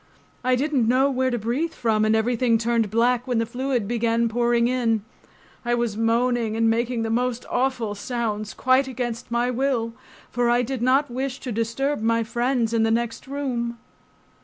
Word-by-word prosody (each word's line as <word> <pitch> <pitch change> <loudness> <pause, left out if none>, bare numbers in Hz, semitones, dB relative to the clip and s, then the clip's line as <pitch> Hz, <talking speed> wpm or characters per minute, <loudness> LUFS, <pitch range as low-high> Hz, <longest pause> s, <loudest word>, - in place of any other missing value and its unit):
I 255 0 +3
didn't 270 -3 +1
know 265 +3 +3
where 260 0 +1
to 240 - -1
breathe 245 +10 -2
from 220 -3 +1
and 215 0 +3
everything 235 +1 +2
turned 230 -1 0
black 240 +3 +1
when 245 -2 0
the 230 - +1
fluid 245 -2 -2
began 230 0 +1
pouring 235 0 +2
in. 235 -4 +1 0.6
I 240 0 +1
was 235 -3 -1
moaning 230 0 +1
and 230 0 +3
making 230 +1 0
the 225 - -2
most 245 +1 -1
awful 245 -4 0
sounds 215 -1 -3
quite 260 +1 +3
against 245 -2 -4
my 240 +1 0
will, 245 -3 -1 0.4
for 245 -1 +1
I 240 +1 +3
did 255 0 -4
not 260 +2 +2
wish 260 +1 -3
to 250 - -5
disturb 230 +4 -1
my 230 +1 +2
friends 235 0 0
in 230 - +2
the 225 - +3
next 230 +2 -1
room. 250 -4 -3
240 Hz, 180 wpm, -24 LUFS, 230-255 Hz, 0.6 s, I